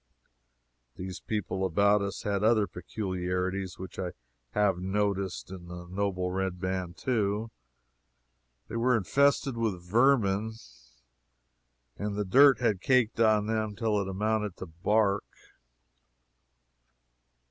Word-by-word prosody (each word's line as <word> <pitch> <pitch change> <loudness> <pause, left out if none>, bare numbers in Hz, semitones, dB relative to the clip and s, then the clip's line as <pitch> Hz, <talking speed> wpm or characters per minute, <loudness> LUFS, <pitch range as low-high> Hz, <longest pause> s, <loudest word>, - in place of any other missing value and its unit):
These 90 0 -6
people 95 -3 -3
about 100 +3 +3
us 100 -1 -4
had 100 -1 -1
other 110 -1 +4
peculiarities, 95 -1 -3
which 95 -1 -8
I 90 -3 -3 0.4
have 100 -4 +2
noticed 95 -1 -1
in 90 -2 -9
the 90 0 -8
noble 95 -1 -1
red 95 -1 -2
man, 90 -1 -3
too: 110 -2 -1 1.2
they - - -4
were 125 +1 +3
infested 140 +4 +2
with 100 -7 -2
vermin, 110 -2 +3 1.4
and 105 0 -3
the 105 0 -1
dirt 135 +7 +6
had 110 -6 +1
caked 125 -4 +2
on 110 -2 +4
them 110 -1 -1
till 110 -3 0
it 95 - -4
amounted 105 +1 -1
to - - -6
bark. 100 +4 +1
100 Hz, 115 wpm, -29 LUFS, 95-110 Hz, 1.4 s, dirt